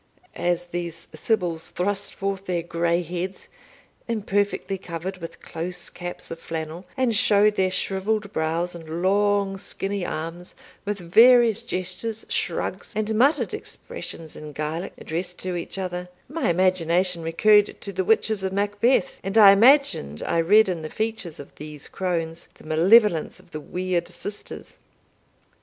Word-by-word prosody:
As 175 0 0
these 170 -1 -5
sibyls 170 -1 -1
thrust 195 +2 -1
forth 195 0 -3
their 175 -2 -1
grey 170 +1 0
heads, 180 +3 -5 0.6
imperfectly 205 -3 -1
covered 180 +1 -5
with 165 -2 -9
close 180 +2 -4
caps 175 0 -7
of 165 - -6
flannel, 165 +2 -5
and 255 -4 +2
showed 210 +1 +5
their 190 -2 +1
shrivelled 200 +3 -1
brows, 165 +3 -1
and 165 0 -6
long 200 0 +2
skinny 195 0 -3
arms, 170 +2 -5 0.3
with 205 0 -2
various 230 +5 +6
gestures, 215 +1 -3
shrugs, 180 +2 -2
and 215 0 -1
muttered 265 +8 +3
expressions 160 -2 -7
in 150 -1 -9
Gaelic 155 +5 -4
addressed 175 +2 -4
to 185 -1 -3
each 175 +2 -5
other, 180 -1 -4 0.2
my 310 - -1
imagination 180 0 +2
recurred 205 +6 +3
to 200 - -5
the 190 - 0
witches 220 0 +2
of 190 - -1
Macbeth, 205 +3 +1
and 195 +3 -1
I 205 -3 +10
imagined 215 - +4
I 170 - 0
read 205 +6 +5
in 175 -3 -2
the 155 - -6
features 220 -6 -3
of 140 - -11
these 150 -1 -8
crones 170 -3 -3
the - - -17
malevolence 170 +3 +4
of - - -21
the 155 - -6
weird 180 +1 -2
sisters. 190 +4 -8
185 Hz, 145 wpm, -24 LUFS, 170-205 Hz, 0.6 s, I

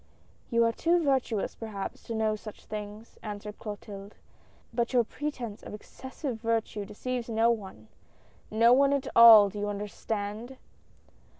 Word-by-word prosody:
"You 235 -1 +3
are 230 - +3
too 340 +7 +1
virtuous, 260 -7 0
perhaps, 210 -4 -6
to 230 - -4
know 220 -1 +1
such 215 0 -11
things," 210 +1 -8
answered 210 0 -7
Clotilde, 205 -1 -8 0.3
" - - -33
but 235 0 0
all 255 - 0
your 240 - +5
pretence 245 -4 -5
of - - -8
excessive 260 +3 -7
virtue 225 -3 -1
deceives 240 +4 -4
no 225 +1 +3
one 190 - -6 0.4
— - - -33 0.2
no 230 +2 +5
one 275 +2 +4
at 280 -2 -1
all, 225 -3 +10
do 205 +1 -7
you 205 - -2
understand 210 +3 -5
220 Hz, 160 wpm, -28 LUFS, 210-240 Hz, 0.4 s, all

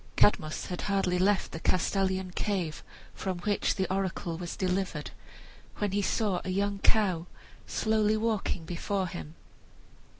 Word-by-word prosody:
Cadmus 155 -6 +3
had 180 - -4
hardly 190 -2 +2
left 195 +1 +3
the 160 - -5
Castalian 190 +1 +1
cave, 180 -5 -1 0.3
from 190 -2 -3
which 205 +2 +1
the 190 - +1
oracle 185 -3 -1
was 175 0 -5
delivered, 185 -5 -1 0.7
when 205 -2 0
he 205 +1 +1
saw 200 -2 +1
a - - -4
young 200 +1 0
cow 185 -6 +2 0.4
slowly 220 -1 +2
walking 215 -6 0
before 185 +3 -1
him. 170 -3 -7
190 Hz, 135 wpm, -30 LUFS, 180-205 Hz, 0.7 s, Cadmus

